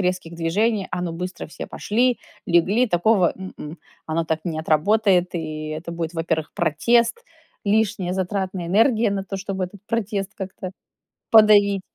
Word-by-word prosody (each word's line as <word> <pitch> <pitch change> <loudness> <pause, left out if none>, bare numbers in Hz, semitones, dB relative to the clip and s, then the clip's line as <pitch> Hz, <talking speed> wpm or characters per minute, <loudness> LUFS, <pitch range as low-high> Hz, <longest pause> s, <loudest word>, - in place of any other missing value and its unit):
резких 180 -2 -2
движений: 195 +5 0
"А, 180 - -2
ну, 175 -2 -3
быстро 180 +2 -5
все 155 - -8
пошли, 245 +3 0 0.3
легли!" 190 +8 +3
Такого- 185 -1 +3
м-м, 175 -4 -8 0.3
оно 165 +1 -1
так 160 0 -1
не 160 -2 -2
отработает. 180 +3 +2
И 155 -2 -4
это 155 +2 -5
будет, 170 0 -4
во-первых, 160 -1 -2
протест, 235 - +2 0.4
лишняя 205 -3 +1
затратная 190 -1 -2
энергия 220 +4 +3
на 200 -1 -1
то, 195 0 -5
чтобы 195 -1 -3
этот 185 +2 -11
протест 210 -3 -2
как-то 190 -1 -6 0.6
подавить. 205 -3 +6
185 Hz, 145 wpm, -22 LUFS, 170-210 Hz, 0.6 s, подавить